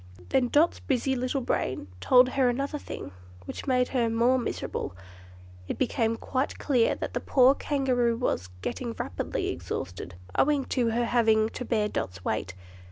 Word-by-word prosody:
Then 250 -2 +3
Dot's 305 +7 +3
busy 265 0 0
little 255 +2 -1
brain 130 - -2
told 250 - +6
her 260 -1 +2
another 275 +4 -2
thing, - - -7 0.3
which - - -7
made 250 -1 +2
her 240 -3 +1
more 235 +3 +3
miserable. 160 - -4 0.7
It - - -4
was 230 -3 +1
quite 260 +2 -2
clear 250 -6 +2
that - - -5
the - - 0
poor 260 0 +5
Kangaroo 255 -5 +1
was 90 - -1
getting - - -3
rapidly - - -3
exhausted, 90 -1 -5 0.2
owing 285 -2 +3
to 245 -3 +2
her 235 +1 +1
having 220 -2 +3
to 250 - -6
bear 220 -4 +1
Dot's 95 - -4
weight. 95 - -2
245 Hz, 160 wpm, -27 LUFS, 225-265 Hz, 0.7 s, told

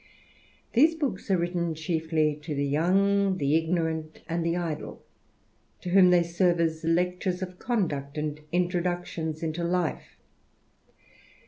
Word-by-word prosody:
These 310 +7 +5
books 260 - -3
are 190 - +4
written 170 -1 -1
chiefly 160 -1 0
to 150 0 -4
the 140 0 0
young, 190 +6 +2
the 145 -1 +1
ignorant, 160 -1 -1
and 165 0 -1
the 165 0 +1
idl^ 170 -4 -4 0.8
to 180 - -5
whom 185 -1 +7
they 175 -1 +5
serve 170 0 +1
as 160 -1 0
lectures 180 +2 0
of 185 -1 -8
conduct, 155 - -2
and 150 0 -3
intro 175 0 +1
ductions 170 -3 -3
into 165 +1 -2
life. 175 -1 -2
170 Hz, 135 wpm, -27 LUFS, 160-180 Hz, 0.8 s, whom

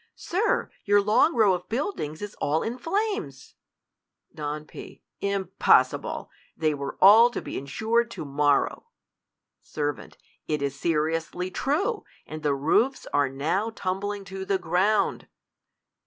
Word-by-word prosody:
Sir, 390 +6 -1
your 205 0 +4
long 210 +10 +3
row 215 -5 +5
of 180 - -5
buildings 225 - -3
is 205 - -6
all 155 +3 +1
in 240 +3 -4
flames! 410 - -3 0.8
Don 150 0 -5
P. - - -12 0.2
Impossible! 195 -1 +1
— - - -35
They 155 -1 +1
were 140 -1 -5
all 220 +5 +8
to 245 - -4
be - - -7
insured 220 +12 0
to 230 - -7
morrow. 145 - +1 0.7
Ser, 145 -1 -2 0.5
It 150 -2 -1
is 140 -1 -1
seriously 165 +4 -1
true! 375 - -1 0.2
and 155 0 -8
the 145 -2 +1
roofs 190 - +1
are 145 -1 +3
now 160 +11 -1
tumbling 200 -1 -3
to 190 0 -6
the 195 0 0
ground 190 +4 +1
190 Hz, 135 wpm, -26 LUFS, 150-225 Hz, 0.8 s, all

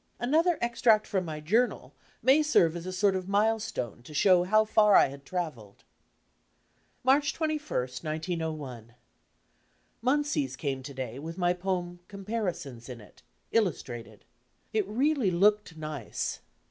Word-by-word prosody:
Another 320 +7 +2
extract 235 -2 +3
from 190 -3 -1
my 155 -2 -5
journal 200 - 0 0.3
may 265 +5 +5
serve 175 - +3
as 170 +1 -6
a - - -3
sort 195 +1 +2
of 185 0 -4
milestone 205 - 0
to 150 +5 -12
show 180 +2 +5
how 215 +3 +4
far 210 -2 +4
I - - +6
had 140 +1 -11
travelled. 150 - -5 1.2
March 280 +3 +3
21, 310 -2 -1 0.4
1901 155 -7 -4 1.1
Mansey's 290 +3 0
came 135 -4 -3
to 140 +1 -9
day 130 -1 -5
with 165 +4 -7
my 175 -1 +2
poem 180 -1 -3
"Comparisons" 190 - -5
in 125 -2 -7
it, 105 - -17 0.3
illustrated. 120 - -2 0.5
It 215 -3 +1
really 260 +1 +1
looked 200 -1 +2
nice. 155 -7 -4
185 Hz, 135 wpm, -29 LUFS, 150-225 Hz, 1.2 s, I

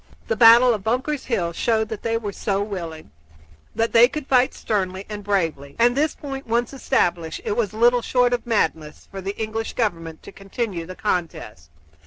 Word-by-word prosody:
The 225 - +1
battle 235 +2 +7
of 210 -3 -4
Bunker's 260 +6 -1
Hill 175 -9 -1
showed 220 +2 0
that 220 - -6
they 230 0 -1
were 210 -3 -4
so 200 0 -2
willing 170 - -7 0.6
that 225 0 0
they 235 +1 +7
could 300 +2 -6
fight 255 -1 +2
sternly 190 -2 -2
and 210 -1 -7
bravely: 165 -8 -2
and 240 +1 +3
this 300 +2 +1
point 270 -3 -7
once 235 +3 0
established, 175 -12 -1
it 205 - -1
was 215 -5 0
little 240 +2 +3
short 245 +1 +2
of 245 - -1
madness 160 -9 -1
for 195 -1 -7
the 195 +2 -5
English 225 0 -3
government 165 -8 -3
to - - -11
continue 195 -3 -5
the 185 - -8
contest. 160 - -4
215 Hz, 185 wpm, -22 LUFS, 185-240 Hz, 0.6 s, battle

